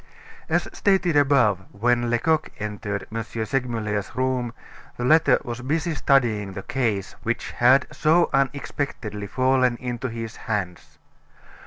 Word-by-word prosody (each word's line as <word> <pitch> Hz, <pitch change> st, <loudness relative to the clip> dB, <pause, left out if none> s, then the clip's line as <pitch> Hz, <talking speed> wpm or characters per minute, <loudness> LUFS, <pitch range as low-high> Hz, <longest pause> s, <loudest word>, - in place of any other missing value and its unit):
As -, -, +1 dB
stated 190 Hz, -5 st, +2 dB
above, 130 Hz, -9 st, +3 dB
when 120 Hz, +3 st, +1 dB
Lecoq 155 Hz, +7 st, +1 dB
entered 105 Hz, -1 st, -4 dB
M. 115 Hz, +1 st, -2 dB
Segmuller's 110 Hz, -2 st, -3 dB
room 130 Hz, -2 st, 0 dB, 0.5 s
the 120 Hz, -, -2 dB
latter 160 Hz, +4 st, +5 dB
was 120 Hz, -2 st, -5 dB
busy 160 Hz, +6 st, -1 dB
studying 115 Hz, -10 st, +1 dB
the 100 Hz, -, -6 dB
case 110 Hz, -7 st, -1 dB
which 115 Hz, +1 st, -2 dB
had 130 Hz, +3 st, +4 dB
so 165 Hz, +2 st, +3 dB
unexpectedly 135 Hz, -6 st, -2 dB
fallen 130 Hz, +1 st, +2 dB
into 125 Hz, 0 st, -4 dB
his 115 Hz, -1 st, -6 dB
hands. 95 Hz, -6 st, -4 dB
120 Hz, 125 wpm, -24 LUFS, 110-135 Hz, 0.5 s, latter